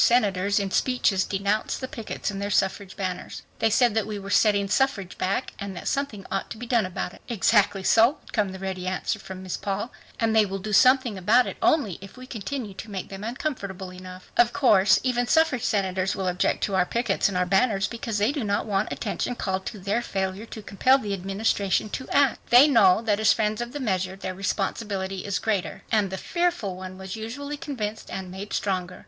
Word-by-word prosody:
senators 205 -4 +3
in 195 -1 -2
speeches 215 -7 +2
denounced 200 +2 -1
the 260 - -4
pickets 225 -3 -4
and 195 0 -5
their 200 - -2
suffrage 195 -1 0
banners. 185 -2 -4 0.2
They 225 - +3
said 235 +1 +3
that 220 -2 0
we 215 -1 -4
were 200 0 -7
setting 205 -2 +3
suffrage 210 -5 0
back 195 +7 -1
and 200 -2 -5
that - - -6
something 255 -9 -2
ought 195 - -2
to - - -7
be 245 - -6
done 230 -5 +2
about 180 0 -4
it." - - -16
"Exactly 205 -3 +2
so," 230 +9 +5
would - - -17
come 205 -4 +1
the 190 - -7
ready 190 -1 -4
answer 190 +4 -2
from 190 -1 -9
Miss 185 - -4
Paul. 200 +4 -3 0.3
"And 225 -2 +1
they 220 - +6
will 195 -1 -3
do 210 +2 -5
something 255 -3 +4
about 230 +7 +4
it - - -5
only 225 - +2
if 195 +5 -12
we 255 - -9
continue 235 -2 -5
to 215 +3 -9
make 195 -3 -5
them 195 +1 -8
uncomfortable 205 -7 -4
enough. 185 0 -11
Of 240 0 +4
course 210 -8 +5
even 245 -1 +1
suffrage 320 -6 +3
senators 190 -2 0
will 190 -1 -2
object 180 0 0
to 200 - -1
our 190 -1 +4
pickets 230 -4 +1
and 190 - -2
our 180 - +2
banners 195 +1 +2
because 230 -2 -4
they 210 +5 +2
do 285 -4 -3
not 205 -1 0
want 205 -1 -1
attention 240 +3 -3
called 190 -4 -3
to 220 - -5
their 200 +4 -1
failure 190 +1 -3
to 220 - -9
compel 255 +7 +3
the 210 -7 -4
Administration 195 +1 0
to 260 - -5
act. 280 -3 +3
They 245 +5 +8
know 220 -6 +5
that 210 -2 +1
as 220 0 +5
friends 215 0 -1
of 240 0 -4
the 290 - -5
measure 190 -6 -1
their 190 -1 -5
responsibility 195 0 -2
is 200 -1 -1
greater." 205 -5 -2
And 210 -3 +2
the 190 - -4
"fearful" 345 - -1
one 185 0 -8
was 190 +1 -6
usually 270 +7 -5
convinced 240 -9 -5
and 190 -1 -6
made 195 +2 -7
stronger. 185 -2 -2
205 Hz, 215 wpm, -25 LUFS, 190-235 Hz, 0.3 s, They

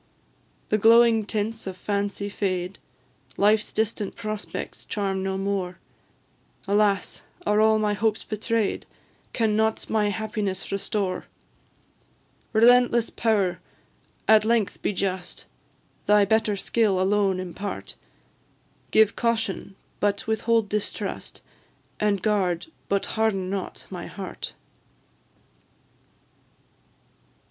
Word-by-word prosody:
The 215 - +2
glowing 225 0 +6
tints 220 0 -2
of 185 -1 -5
Fancy 200 +1 -2
fade, 185 -2 -2 0.6
Life's 210 +1 +3
distant 215 -1 -1
prospects 215 -2 -5
charm 195 -2 -2
no 190 0 -1
more; 195 -2 -2 0.9
Alas! 200 -1 +1 0.2
are 210 +1 +3
all 220 0 +5
my 210 -1 +1
hopes 215 +1 0
betray'd? 215 0 -1 0.4
Can 220 -3 +1
nought 220 0 +1
my 210 -2 +2
happiness 205 -2 -3
restore? 195 -1 -2 1.3
Relentless 240 +1 +5
power! 205 -6 +1 0.7
at 220 -1 +7
length 225 -2 +1
be - - 0
just, 185 -2 -3 0.6
Thy 210 -1 +6
better 215 0 +2
skill 205 -2 +1
alone 195 0 +2
impart; 185 +2 -5 1.0
Give 220 -1 +4
Caution, 225 -4 -1 0.2
but 200 -1 0
withhold 220 0 +1
Distrust, 210 0 -4 0.6
And 205 -3 +1
guard, 190 -5 +1 0.2
but 200 0 +1
harden 200 -4 0
not, 195 -2 -5
my - - -6
heart! - - -7
210 Hz, 100 wpm, -25 LUFS, 195-220 Hz, 1.3 s, at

